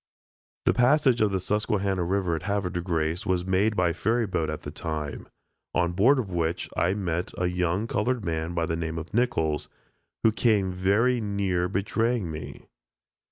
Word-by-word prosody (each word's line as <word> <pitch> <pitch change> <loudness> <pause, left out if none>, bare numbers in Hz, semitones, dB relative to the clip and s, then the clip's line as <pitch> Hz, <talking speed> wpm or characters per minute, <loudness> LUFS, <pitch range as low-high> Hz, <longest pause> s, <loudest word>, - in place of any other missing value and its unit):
The - - +4
passage 130 -1 +4
of 105 - +4
the 95 -1 -1
Susquehanna 100 -1 0
river 90 -1 0
at 80 - -4
Havre 100 -1 -1
de 85 - -2
Grace 85 0 -1
was 90 -1 +1
made 95 +3 +2
by 90 -3 +2
ferry 115 +5 +1
boat 85 -5 -1
at 75 - -4
that 75 - -7
time, 75 -4 -4 0.5
on 85 -1 +2
board 110 +11 +4
of 110 -7 -2
which 85 -1 -1
I 90 +3 +2
met 90 -3 -2
a 90 - 0
young 90 +3 0
colored 120 -2 -1
man 80 +1 -2
by 85 -1 +1
the 80 -1 -1
name 80 0 -3
of 80 +5 -7
Nichols, 80 -11 0 0.5
who 110 - +5
came 105 -4 +2
very 105 +7 +2
near 95 -4 0
betraying 105 0 0
me. 75 0 -8
95 Hz, 175 wpm, -26 LUFS, 85-105 Hz, 0.5 s, who